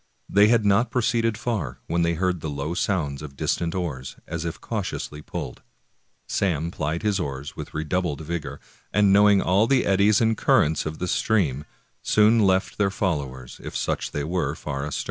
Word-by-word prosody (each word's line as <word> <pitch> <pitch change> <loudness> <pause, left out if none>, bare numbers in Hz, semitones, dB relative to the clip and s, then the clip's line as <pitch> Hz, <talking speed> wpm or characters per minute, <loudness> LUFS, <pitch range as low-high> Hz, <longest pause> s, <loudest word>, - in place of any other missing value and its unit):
They 100 +2 +5
had 115 -1 +3
not 100 +4 +3
proceeded 115 -2 +1
far 100 - -3
when 85 +1 0
they 85 0 +1
heard 90 0 0
the 80 - -3
low 70 +3 -3
sounds 80 -7 -1
of 70 -2 -9
distant 85 0 -1
oars, 75 -8 -4
as 80 0 -4
if 85 - -4
cautiously 75 0 -4
pulled. 60 - -6 0.7
Sam 85 -4 0
plied 80 0 -3
his 105 -2 +1
oars 70 -3 -5
with - - -8
redoubled 80 0 -1
vigor, 85 0 -5 0.3
and 100 -1 +4
knowing 100 -1 +5
all 100 +5 +3
the 135 -1 +3
eddies 100 +2 +4
and 115 -1 +2
currents 80 -6 +2
of 80 0 -5
the 90 - -3
stream, 80 -11 +1 0.4
soon 110 +2 +4
left 95 -2 +2
their 100 -1 +3
follow 85 -9 -1
ers, 65 -1 -12
if - - -5
such - - -2
they 75 - -3
were, 80 -3 -1
far 70 -3 -4
astern. 75 - -3
85 Hz, 185 wpm, -24 LUFS, 75-100 Hz, 0.7 s, They